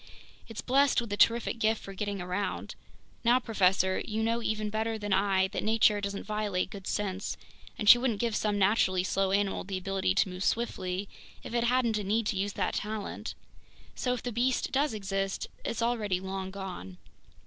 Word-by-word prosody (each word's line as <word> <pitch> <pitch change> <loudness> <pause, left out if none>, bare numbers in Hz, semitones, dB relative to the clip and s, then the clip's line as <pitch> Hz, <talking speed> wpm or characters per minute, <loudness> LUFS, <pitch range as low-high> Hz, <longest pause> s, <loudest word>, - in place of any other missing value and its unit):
It's 225 - -6
blessed 275 +2 +3
with 230 -4 -4
a - - +1
terrific 230 +2 +3
gift 220 0 +2
for 195 - -9
getting 200 0 -3
around. 180 +3 -3 0.5
Now, 240 +1 +5
professor, 190 -5 +2
you 220 0 -2
know 230 +1 +1
even 215 -2 -1
better 220 +1 -1
than 205 -2 -2
I 190 -1 +3
that 205 - -3
nature 215 -1 +3
doesn't 200 0 -3
violate 210 -3 -1
good 195 -2 -8
sense, 195 -1 -2 0.4
and 210 - -3
she 240 - +10
wouldn't 240 -5 0
give 230 -1 0
some 210 -1 0
naturally 190 -2 +3
slow 190 +1 0
animal 200 0 +1
the 190 0 -4
ability 190 - -1
to - - +3
move 180 +1 -5
swiftly 195 -5 -1 0.4
if - - -7
it 235 0 +2
hadn't 235 -3 +2
a - - -3
need 215 +3 +1
to 210 - 0
use 200 +1 -1
that - - -1
talent. 210 -1 -4 0.6
So 250 - -1
if 245 - -8
the 245 - -3
beast 245 +3 0
does 275 -3 +1
exist, 195 -1 -2 0.2
it's 230 - -2
already 215 -6 0
long 190 0 -4
gone!" 185 - -7
205 Hz, 190 wpm, -29 LUFS, 195-225 Hz, 0.6 s, she